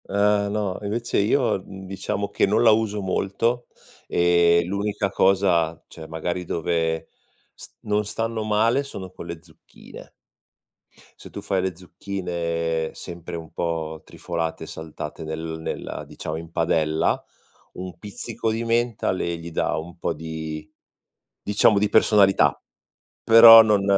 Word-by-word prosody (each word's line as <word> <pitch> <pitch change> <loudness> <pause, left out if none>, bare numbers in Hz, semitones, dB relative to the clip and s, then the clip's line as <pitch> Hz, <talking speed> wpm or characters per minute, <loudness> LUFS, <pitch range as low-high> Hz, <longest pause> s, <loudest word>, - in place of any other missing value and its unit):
Eh 100 +1 +2
no, 100 -3 -2
invece 115 +3 -1
io, 110 +1 +2
mhmm, 95 -1 -10
diciamo 95 +1 -3
che 100 - +1
non 105 +4 +2
la 115 - +7
uso 105 -1 +1
molto, 100 +6 -1 0.4
e 85 0 +4
l'unica 100 +1 -2
cosa, 95 -4 +2
cioè 80 -1 -11
magari 85 +3 -3
dove 80 -1 -1 0.4
s - - -9
non 105 0 0
stanno 115 +1 -2
male, 110 +5 +2
sono 95 -10 -8
con 85 - -10
le 85 -1 -7
zucchine. - - -15 1.1
Se - - -12
tu - - -8
fai 95 -1 0
le 95 -2 -2
zucchine 85 -3 -3
sempre 85 -1 -8
un 80 -1 -8
po' 80 -2 -3
trifolate, 80 -1 -4
saltate 80 -1 -7
nel 80 +1 -5
nella 80 - -5
diciamo 80 - -6
in 85 +1 -9
padella, 80 -1 +1 0.5
un 90 -2 -8
pizzico 105 +3 -4
di 115 +1 -2
menta, 115 -1 0
le 85 -2 -2
gli 85 +1 -9
dà 80 - -1
un 85 +3 -7
po' - - -2
di, 80 -1 -6 0.7
diciamo 105 0 +3
di 105 0 +1
personalità, 100 -2 +4 0.6
però 115 0 +10
non 105 -3 +2
95 Hz, 140 wpm, -23 LUFS, 80-105 Hz, 1.1 s, però